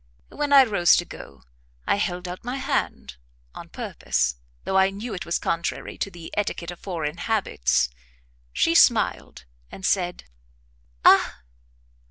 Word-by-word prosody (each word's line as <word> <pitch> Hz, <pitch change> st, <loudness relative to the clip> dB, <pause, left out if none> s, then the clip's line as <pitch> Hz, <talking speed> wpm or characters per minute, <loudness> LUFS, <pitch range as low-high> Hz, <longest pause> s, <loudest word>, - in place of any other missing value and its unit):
When 295 Hz, -1 st, -3 dB
I 275 Hz, -1 st, +9 dB
rose 200 Hz, -8 st, +4 dB
to 175 Hz, -, 0 dB
go, 70 Hz, -, -12 dB, 0.4 s
I -, -, +2 dB
held 180 Hz, -3 st, -2 dB
out 180 Hz, +1 st, -7 dB
my 245 Hz, +2 st, -4 dB
hand, 65 Hz, -, -2 dB, 0.4 s
on -, -, -10 dB
purpose, 65 Hz, -1 st, -2 dB, 0.3 s
though 190 Hz, -, -2 dB
I 190 Hz, 0 st, +5 dB
knew 210 Hz, +4 st, -6 dB
it 180 Hz, -, -6 dB
was 170 Hz, -, +1 dB
contrary 170 Hz, 0 st, -3 dB
to -, -, -2 dB
the 170 Hz, -3 st, -11 dB
etiquette 180 Hz, -4 st, -2 dB
of 175 Hz, -, -11 dB
foreign 165 Hz, -4 st, -4 dB
habits; 185 Hz, -, +1 dB, 0.6 s
she -, -, +2 dB
smiled, 60 Hz, -, +3 dB, 0.3 s
and 190 Hz, -, -7 dB
said 180 Hz, -2 st, 0 dB, 0.8 s
"Ah! -, -, +5 dB
180 Hz, 145 wpm, -24 LUFS, 155-200 Hz, 0.8 s, I